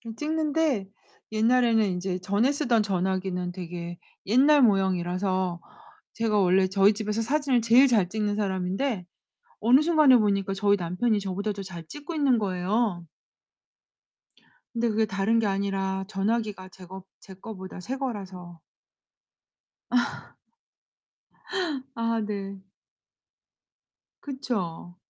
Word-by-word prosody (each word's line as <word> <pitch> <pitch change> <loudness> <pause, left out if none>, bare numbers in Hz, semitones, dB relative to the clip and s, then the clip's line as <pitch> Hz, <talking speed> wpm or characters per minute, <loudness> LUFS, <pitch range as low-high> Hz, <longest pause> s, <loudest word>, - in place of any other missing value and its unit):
좀 230 -1 -8
찍는데 305 -7 0 0.4
옛날에는 225 0 +3
인제 180 -1 -2
전에 205 +8 +1
쓰던 245 -6 +1
전화기는 185 -2 -2
되게 175 -1 -7 0.3
옛날 275 +6 +5
모형이라서 185 -3 +1 0.5
제가 225 -2 +1
원래 190 0 +3
저희 195 +2 +4
집에서 215 +1 -2
사진을 270 0 +1
제일 235 +4 +6
잘 210 -8 +2
찍는 210 +1 -1
사람인데 195 +2 -1 0.6
어느 245 +6 +5
순간에 305 -5 +5
보니까 200 -2 +1
저희 200 +1 +2
남편이 185 +5 0
저보다 200 +2 -3
더 200 - -7
잘 175 -3 -9
찍고 295 +3 -8
있는 275 -5 +3
거예요. 195 0 -1 1.7
근데 235 0 0
그게 220 0 +1
다른 200 +3 +1
게 220 - +1
아니라 195 -1 -1
전화기가 205 -1 -2
제 185 -1 -14
거 190 +1 -10 0.2
제 190 - -13
거보다 190 -1 -9
새 255 +9 -5
거라서. 190 - -6 1.3
아 245 -1 +2 1.8
아 230 0 -1
네. 200 -2 -5 1.6
그쵸. 200 - -4
205 Hz, 245 characters per minute, -26 LUFS, 190-235 Hz, 1.8 s, 제일